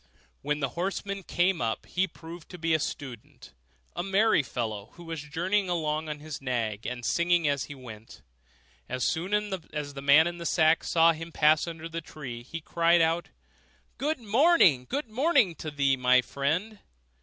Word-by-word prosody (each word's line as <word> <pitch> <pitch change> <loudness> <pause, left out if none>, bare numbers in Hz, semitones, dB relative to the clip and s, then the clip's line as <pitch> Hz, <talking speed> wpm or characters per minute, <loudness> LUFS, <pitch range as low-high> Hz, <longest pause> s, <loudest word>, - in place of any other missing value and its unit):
When 150 +1 -2
the 135 - 0
horseman 195 +6 -3
came 175 -1 0
up, 115 -1 -2
he 190 +1 0
proved 170 -1 -11
to 180 - -9
be 165 -1 0
a 160 - +3
student, 130 -6 -7 0.4
a 175 - -2
merry 195 +1 +3
fellow, 110 -5 -4
who 175 - -13
was 165 -2 -5
journeying 180 +7 -1
along 155 -2 -1
on 150 -1 -5
his 155 -2 -7
nag, 115 -5 -2
and 120 -1 -5
singing 170 +1 +2
as 140 -2 0
he 145 - -9
went. 115 -4 -12 0.7
As 130 - -1
soon 175 +4 -1 0.2
as 150 -5 -5
the 140 - -7
man 140 +3 +6
in 175 0 -4
the 170 - -6
sack 160 -1 +3
saw 165 0 +4
him 165 +1 -7
passing 155 +1 +3
under 165 -1 -7
the 165 0 -5
tree, 130 -6 -8
he 165 +7 -7
cried 170 +2 +3
out, 165 +1 +1 0.7
'Good 300 +1 -1
morning! 220 - +4
good 285 -2 -2
morning 255 - +2
to 155 - -5
thee, 140 -2 +2
my 125 0 +4
friend! 165 - -2
160 Hz, 180 wpm, -28 LUFS, 140-175 Hz, 0.7 s, man